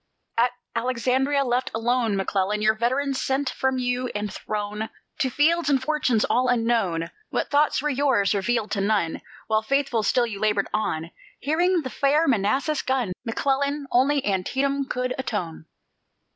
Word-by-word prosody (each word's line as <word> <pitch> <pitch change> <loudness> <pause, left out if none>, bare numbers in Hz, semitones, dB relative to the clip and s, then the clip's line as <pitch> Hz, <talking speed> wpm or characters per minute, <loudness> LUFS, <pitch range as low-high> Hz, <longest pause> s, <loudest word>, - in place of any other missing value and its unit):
At 235 +2 +3 0.3
Alexandria, 255 +4 +1
left 250 0 0
alone, 230 -1 +1
McClellan 195 +1 0
Your 215 0 +5
veterans 260 +5 0
sent 270 0 0
from 265 0 0
you, 250 0 -1
and 210 -1 -3
thrown 210 +1 -4 0.3
To 265 -4 +1
fields 320 +5 +2
and 275 -2 +3
fortunes 260 -5 +1
all 255 +1 +2
unknown 225 -9 +1 0.2
What - - -2
thoughts 290 -1 +2
were 300 - +1
yours, 260 -8 +2
revealed 220 +2 0
to 200 - 0
none, 200 -5 0 0.2
While 220 0 +1
faithful 270 0 0
still 240 +3 +2
you 210 -4 -6
labored 210 -2 +1
on 170 -6 -2 0.3
Hearing 340 +4 +1
the 260 - -5
far 295 +4 +2
Manassas 265 +6 +1
gun! 255 -8 -1
McClellan, 280 +4 0
Only 275 +3 +3
Antietam 270 +9 0
could 250 -1 -2
atone. 175 -10 -4
250 Hz, 150 wpm, -24 LUFS, 215-275 Hz, 0.3 s, Your